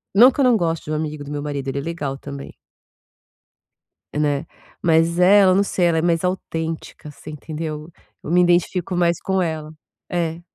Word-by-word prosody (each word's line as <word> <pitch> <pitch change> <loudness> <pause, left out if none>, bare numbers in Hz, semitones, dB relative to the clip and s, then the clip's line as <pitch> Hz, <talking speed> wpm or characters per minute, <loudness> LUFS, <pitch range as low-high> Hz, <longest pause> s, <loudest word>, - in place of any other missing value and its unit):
não 245 +5 +8
que - - -9
eu 275 - +5
não 245 -3 +5
gosto 165 -3 -1
de 155 - -5
um - - 0
amigo 150 -1 -4
do 140 - -9
meu 145 0 -4
marido. 140 -2 -4
Ele 135 +1 -2
é - - -1
legal 145 -4 -4
também. 140 0 -8 1.6
Né. 150 0 0 0.4
Mas 165 +1 +3
ela, 190 +1 +6
eu 185 - +3
não 200 - +4
sei, 180 -3 +1
ela 165 - +2
é - - +2
mais 170 0 +1
autêntica. 165 -4 -4
Você 145 - -12
entendeu? 155 +1 -6 0.3
Eu 160 - -5
me 180 - +5
identifico 175 +1 +1
mais 170 -1 +2
com 190 -1 0
ela. 155 -3 -3 0.4
É. 170 -2 -2
165 Hz, 195 wpm, -21 LUFS, 150-180 Hz, 1.6 s, não